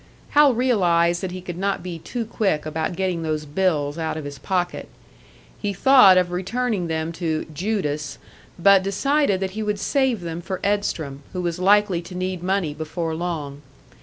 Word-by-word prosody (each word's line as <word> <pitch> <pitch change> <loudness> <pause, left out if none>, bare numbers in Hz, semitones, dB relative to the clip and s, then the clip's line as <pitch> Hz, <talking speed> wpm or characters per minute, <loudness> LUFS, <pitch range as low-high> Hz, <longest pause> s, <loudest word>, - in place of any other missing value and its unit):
Hal 290 -4 +5
realised 175 -9 +2
that 190 - -3
he 185 +1 -7
could 175 -1 -7
not 195 0 -1
be 175 -2 -6
too 235 +7 -4
quick 195 -9 -1
about 160 +2 -2
getting 185 -2 -1
those 155 -1 -2
bills 150 -2 0
out 160 -1 -2
of 155 - -6
his 140 -1 -7
pocket. 180 -2 -2 0.7
He 205 -1 -2
thought 200 -3 +7
of 180 -1 +2
returning 195 +1 -1
them 160 0 -2
to 160 -2 -2
"Judas," 155 -5 -2 0.4
but 195 +2 +6
decided 205 +3 +1
that 190 -1 -2
he 215 +3 -5
would 210 -1 -1
save 265 -4 +1
them 170 0 -5
for 190 +1 -4
Edstrom, 170 -9 -1
who 180 - -2
was 170 0 -2
likely 195 -1 +3
to 180 +1 -10
need 185 -1 -3
money 185 -4 0
before 160 +2 -4
long. 160 -4 -4
180 Hz, 175 wpm, -23 LUFS, 160-200 Hz, 0.7 s, thought